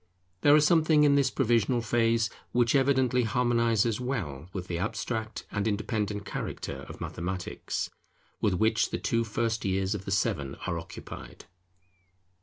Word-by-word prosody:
There 145 - +7
is 150 0 +5
something 155 -2 +5
in 145 -1 +5
this 140 -2 +3
provisional 120 -2 +2
phase 115 0 +2 0.2
which 120 -2 +3
evidently 130 -2 +3
harmonizes 115 -1 +2
well 90 - -3
with 95 -2 -5
the 85 -2 -3
abstract 110 +2 -3
and 100 +1 -1
independent 105 -1 -2
character - - -5
of - - -9
Mathematics, 90 +1 -4 0.5
with 100 -4 +2
which 110 +4 +2
the - - -2
two 115 0 0
first 115 0 -1
years 95 0 0
of 100 -2 -5
the - - -4
seven 70 -8 0
are 85 -3 -1
occupied. - - -10
110 Hz, 145 wpm, -28 LUFS, 100-125 Hz, 0.5 s, There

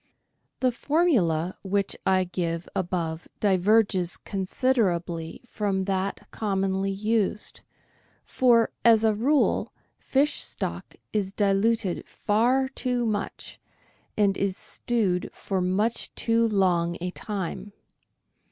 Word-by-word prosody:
— - - -49
The 255 -1 +3
formula 230 - +1
which 200 0 -1
I 185 -1 +4
give 170 -2 -3
above 170 -3 -2
diverges 195 -2 +2
considerably 185 -6 -1
from 200 -5 -1
that 190 0 -2
commonly 195 -2 -1
used, 210 +1 -1 0.6
for, 235 -3 +3
as 225 -2 +6
a 220 -1 +4
rule, 270 +8 +2 0.3
fish 280 +3 +1
stock - - -5 0.2
is 200 -3 0
diluted 200 -1 +1
far 245 +6 +1
too 250 -2 -1
much, 210 -3 -4 0.6
and 200 -2 +3
is 195 -1 -1
stewed 205 -7 -1
for 190 -2 -2
much 200 +6 0
too 230 0 +2
long 175 -5 +1
a 180 +1 -3
time. 205 0 -5
200 Hz, 105 wpm, -26 LUFS, 185-230 Hz, 0.6 s, as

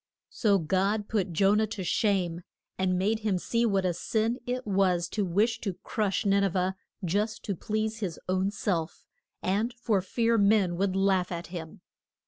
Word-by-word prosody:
So 210 -5 +3
God 195 +5 0
put 200 -4 -1
Jo 195 +4 +3
nah 215 +1 +2
to 210 -3 -5
shame, 180 -3 +1 0.3
and 185 -1 +1
made 210 +4 +1
him 210 -4 0
see 230 +6 0
what 195 -3 +1
a 180 - +1
sin 225 +7 -1
it 250 +1 -2
was 190 -4 +2
to 210 - -1
wish 215 +6 +1
to 195 -5 -3
crush 210 -3 -1
Nin 200 0 +3
e - - +4
veh 185 +1 0 0.3
just 210 +5 -1
to 200 - -2
please 215 +4 -2
his 185 -7 -4
own 185 +1 +1
self 180 -5 -2 0.4
and 205 +6 +1
for 225 -5 +1
fear 230 +4 +1
men 200 -3 +3
would 190 +1 0
laugh 190 -2 +2
at 170 -1 -4
him. 170 +2 -7
195 Hz, 180 wpm, -28 LUFS, 185-215 Hz, 0.4 s, e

